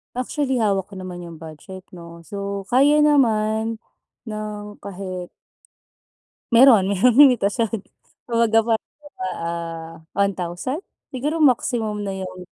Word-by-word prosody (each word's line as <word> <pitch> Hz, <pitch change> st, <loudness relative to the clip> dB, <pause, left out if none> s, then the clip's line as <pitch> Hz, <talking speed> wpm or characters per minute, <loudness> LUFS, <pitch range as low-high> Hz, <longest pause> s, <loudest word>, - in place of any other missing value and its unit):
Actually, 260 Hz, 0 st, -1 dB
hawak 200 Hz, -2 st, 0 dB
ko -, -, -7 dB
naman 180 Hz, -1 st, -7 dB
'yung 165 Hz, -2 st, -10 dB
budget, 165 Hz, +4 st, -11 dB
'no. 170 Hz, -1 st, -12 dB
So, 200 Hz, +2 st, -6 dB
kaya 285 Hz, +4 st, +4 dB
naman 225 Hz, -6 st, +2 dB, 0.5 s
ng 210 Hz, -1 st, -6 dB
kahit 185 Hz, -2 st, -7 dB, 1.2 s
Meron, 230 Hz, -5 st, +7 dB
merong 230 Hz, +5 st, +3 dB
limitasyon. 230 Hz, -5 st, +4 dB, 0.5 s
Kumbaga, 230 Hz, -1 st, +3 dB
parang 225 Hz, 0 st, 0 dB, 0.2 s
ano 295 Hz, -, -14 dB
ba, 185 Hz, -, -3 dB
ah, 165 Hz, -1 st, -5 dB, 0.2 s
1,000? 200 Hz, -, -2 dB, 0.2 s
Siguro, 295 Hz, +4 st, -3 dB
maximum 230 Hz, -6 st, +1 dB
na 195 Hz, -, -3 dB
'yong 185 Hz, -1 st, -7 dB
210 Hz, 120 wpm, -22 LUFS, 185-240 Hz, 1.2 s, Meron